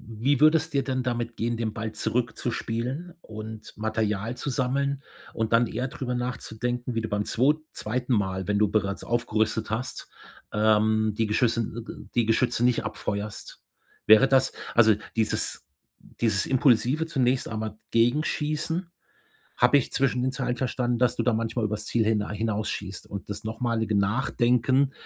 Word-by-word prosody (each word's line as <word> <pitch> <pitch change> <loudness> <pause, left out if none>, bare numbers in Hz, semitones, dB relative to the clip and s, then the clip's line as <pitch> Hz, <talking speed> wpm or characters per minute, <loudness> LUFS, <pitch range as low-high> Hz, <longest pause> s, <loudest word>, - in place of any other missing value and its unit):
Wie 120 +5 -1
würde 155 +1 +7
es 160 +1 -6
dir 140 -2 0
denn 130 -1 -1
damit 120 -2 -2
gehen, 115 +1 -1
den 110 -2 -2
Ball 110 0 -3
zurückzuspielen 120 +6 -2
und 110 0 -9
Material 110 +1 -1
zu 130 - -5
sammeln 140 +1 0 0.3
und 110 0 -2
dann 115 +1 +5
eher 130 +4 -3
drüber 130 -4 -4
nachzudenken, 125 0 -3
wie 115 - 0
du 110 - -3
beim 105 0 -1
zwo 135 +6 +3 0.2
2. 125 +3 -2
Mal 95 -3 -1
wenn 105 - +2
du 105 - +4
bereits 100 -2 0
aufgerüstet 110 -2 0
hast, 120 +3 -4 0.4
ähm, 110 0 +3
die 110 - +2
Geschüsse, 115 +2 +2
d 115 +2 -6
d - - -10
die 120 -2 +2
Geschütze 120 +1 +2
nicht 125 -3 +2
abfeuerst? 105 -1 -5 0.5
Wäre 110 +5 +7
das 130 -1 +3 0.2
also 110 -2 +6 0.2
dieses 110 - -1 0.5
dieses 110 -4 +2
impulsive 130 +4 +3
zunächst 130 -4 +1
einmal 110 -1 -4
Gegenschießen, 155 +7 0 0.7
habe 125 +4 +5
ich 135 - -1
zwischen 125 -2 +1
den 130 - +1
Zeilen 125 -2 -2
verstanden, 125 -1 -1
dass 125 -1 +3
du - - +1
da 125 - +2
manchmal 115 0 -1
übers 105 0 -3
Ziel 115 - +1
hinei 105 -1 0
hinausschießt. 105 -3 -3
Und 100 0 -7
das 105 - -5
nochmalige 110 -1 -1
Nachdenken 125 +5 +2
115 Hz, 160 wpm, -26 LUFS, 110-125 Hz, 0.7 s, würde